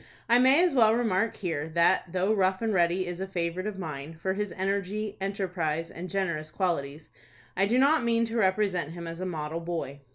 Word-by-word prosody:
I 240 +1 +5
may 265 +7 +6
as 355 -4 +2
well 225 -4 +5
remark 225 -2 +1
here, 160 -5 -3
that, 170 +1 +3
though 185 +4 +1
Rough 190 0 +1
and 220 -1 0
Ready 175 0 +2
is 175 +1 -5
a 190 - -3
favorite 180 +1 -2
of 210 -2 -5
mine, 155 -3 -6
for 190 +2 -1
his 205 -1 -3
energy, 200 +2 -2
enterprise, 175 -5 -2
and 180 +2 -7
generous 170 -6 -2
qualities, 155 -4 -2 0.4
I 195 +2 +2
do 235 +4 +2
not 280 +2 +4
mean 230 0 +2
to 230 +1 -4
represent 190 -6 +1
him 170 0 -7
as 165 0 -6
a 185 - -3
model 160 -1 -4
boy. 165 -5 -4
185 Hz, 200 wpm, -28 LUFS, 170-210 Hz, 0.4 s, may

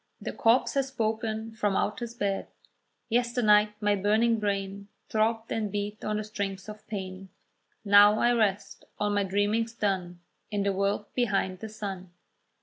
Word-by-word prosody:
The - - -5
corpse 230 +3 +3
has 275 -1 +1
spoken 220 -2 -2
from 210 -3 -1
out 210 - 0
his 235 -1 -6
bed, 200 -3 -2 0.6
"Yesternight 220 -3 +3
my 205 -1 +2
burning 220 +3 +2
brain 200 -1 -2 0.2
Throbbed 225 +1 0
and 215 -3 -1
beat 205 +1 -4
on 215 0 -1
the 215 - -2
strings 200 -3 -4
of 210 0 -10
pain: 190 -2 -6 0.6
Now 205 +1 +7
I 240 +2 +3
rest, 205 -4 0 0.2
all 210 0 +1
my 205 0 +2
dreaming's 205 +4 0
done, 185 -5 -2 0.3
In 205 -2 -1
the 200 0 +1
world 200 +2 0
behind 195 -6 0
the 220 - -7
sun. 195 -4 -6
210 Hz, 155 wpm, -28 LUFS, 200-225 Hz, 0.6 s, Now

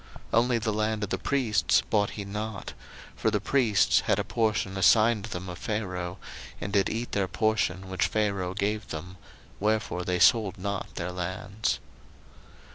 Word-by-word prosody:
01:047:022 115 - +6
Only 120 0 +1
the 110 -1 -1
land 110 0 0
of 100 - -2
the - - +1
priests 105 - +2
bought 105 -2 +3
he 100 - -6
not; 105 0 -5 0.4
for - - +1
the 105 -1 +1
priests 110 -4 +3
had - - +1
a - - 0
portion 110 -4 0
assigned 110 +2 +4
them 95 -4 -6
of 90 -1 -7
Pharaoh, 90 -4 -3 0.4
and 100 - -5
did 100 -2 +3
eat 115 +2 -3
their 100 -2 0
portion 100 -3 0
which 95 -1 0
Pharaoh 100 -4 -1
gave 105 +1 -1
them: 90 +4 -7 0.4
wherefore 105 -3 0
they 90 0 0
sold 105 +1 +4
not 100 +1 -4
their 90 +1 -3
lands. 95 +4 -2
100 Hz, 165 wpm, -28 LUFS, 95-110 Hz, 0.4 s, 01:047:022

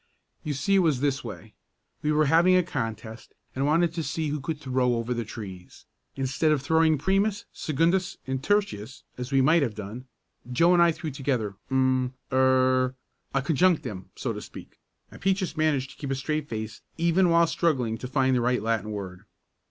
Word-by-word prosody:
"You 150 -2 -2
see 195 +8 +2
it - - +5
was 160 -8 +2
this 140 -1 0
way: 110 -1 -9 0.5
We 150 - 0
were 155 0 +3
having 170 +5 +5
a 180 - +4
contest, 115 -6 -5 0.2
and 135 +2 0
wanted 165 +2 +2
to 165 - -2
see 160 +1 -2
who 150 +1 -2
could 150 +1 -4
throw 130 -3 +1
over 115 +1 -2
the 120 -1 -2
trees. 95 -5 -10 0.3
Instead 135 +4 0
of 150 - +2
throwing 160 +1 +3
primus, 195 +6 0
secondus, 170 +5 0
and 130 0 -3
tertius 155 - -1 0.2
as 125 +2 -5
we 135 -1 +4
might 155 +5 +4
have 120 -7 -1
done, 110 +5 -7 0.5
Joe 165 +8 +4
and 175 - +5
I 170 0 +6
threw 160 -1 -5
together 130 -7 -2 0.2
um 130 -1 +1 0.2
er 130 0 +3 0.4
ah 135 - +3
conjunctim 140 - +1
so - - -3
to - - -6
speak," - - -12 0.3
and - - -13
Peaches 190 -4 0
managed 150 -4 0
to - - -16
keep 140 - -5
a 135 - 0
straight 150 +2 -3
face 110 -2 -5 0.2
even 170 +2 +3
while 170 0 +5
struggling 130 -10 0
to 125 - -5
find 130 0 +2
the 125 - +2
right 125 -2 +1
Latin 110 -2 -1
word. 100 -2 -6
135 Hz, 190 wpm, -26 LUFS, 125-160 Hz, 0.5 s, I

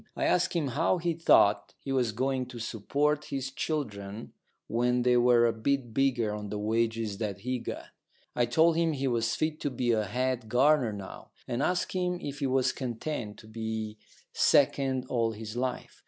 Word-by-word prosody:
I - - -2
asked 180 - +2
him 155 -5 0
how 160 +8 +1
he 170 0 -1
thought 105 -10 +3
he 135 - -6
was 125 -4 +1
going 130 +2 -1
to 125 -1 -9
support 140 +7 -1
his 135 -1 -4
children 110 -9 -4 0.3
when 125 +2 +1
they 125 0 +4
were 120 -1 +5
a 115 - +2
bit 120 +1 -1
bigger 125 -5 +1
on 105 -1 -5
the 105 - -3
wages 110 -1 -1
that 100 -3 -3
he 125 +3 -2
got. - - -6 0.5
I 120 -1 +2
told 160 +7 +4
him 165 -1 +2
he 135 -1 -1
was 115 -2 0
fit 155 0 -1
to 145 - -1
be 125 -2 0
a 110 -2 +1
head 125 +1 -2
gardener 130 0 +4
now, 100 -2 -9 0.2
and 120 +2 -2
asked 180 +4 0
him 180 -1 -1
if 145 -4 -6
he 140 - 0
was 130 0 +2
content 120 -3 -4
to 110 - -16
be 110 -1 -4 0.3
second 135 -2 +3
all 115 -3 0
his 110 +1 -7
life. 125 0 -3
125 Hz, 185 wpm, -29 LUFS, 110-140 Hz, 0.5 s, were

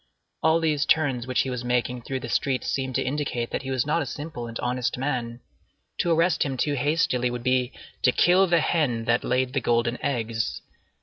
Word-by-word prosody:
All 160 +1 +4
these 155 -3 +1
turns 135 -6 +2
which 130 - +2
he 130 - -2
was 125 -1 -4
making 125 0 -1
through 130 +2 -4
the - - -5
streets 135 -2 0
seemed 130 -2 -2
to - - +1
indicate 130 -4 -2
that - - -2
he 135 - -6
was 130 -1 0
not 155 +3 +1
a 145 - -3
simple 145 -2 -6
and 115 0 -6
honest 125 0 -1
man. 125 -3 -3 0.6
To 175 - +1
arrest 165 0 +2
him 135 -2 0
too 145 +3 0
hastily 140 -3 +1
would 120 -1 -5
be 130 0 +1 0.3
"to 125 - +4
kill 180 +7 +4
the 170 -2 +3
hen 130 -9 0
that 120 +1 +2
laid 130 +1 0
the 135 - 0
golden 120 +1 0
eggs." 115 -4 -2
130 Hz, 205 wpm, -25 LUFS, 120-150 Hz, 0.6 s, All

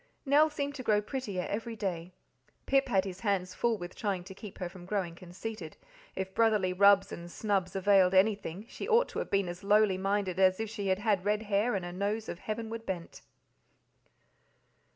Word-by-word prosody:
Nell 295 +3 +5
seemed 285 -1 -3
to 280 - -6
grow 215 -4 +3
prettier 210 -5 -4
every 225 +2 -4
day. 185 -5 -4 0.5
Pip 275 0 +3
had 195 -6 +2
his 190 -1 -6
hands 190 -3 -1
full 235 +3 0
with 175 -2 -7
trying 195 -5 -2
to 190 +1 -10
keep 200 +1 -10
her 180 - -3
from 175 0 -12
growing 190 -4 -1
conceited; 180 0 -8 0.4
if 190 0 -4
brotherly 210 -5 +2
rubs 200 +1 +5
and 170 0 -7
snubs 195 -2 -1
availed 190 -1 +4
anything, 200 -1 +1
she - - -7
ought 470 +2 +4
to - - -4
have - - -4
been 195 -2 +1
as 175 +1 -7
lowly 205 -2 +4
minded 195 -1 -1
as 185 0 +4
if 220 -1 -3
she 205 -3 -4
had 190 0 +2
had 205 -3 +1
red 210 +2 0
hair 210 +2 +1
and 185 -2 -2
a 175 - -6
nose 205 +4 -2
of 170 - -6
heavenward 225 +1 -5
bent. 180 -5 -6
200 Hz, 195 wpm, -30 LUFS, 185-220 Hz, 0.5 s, Nell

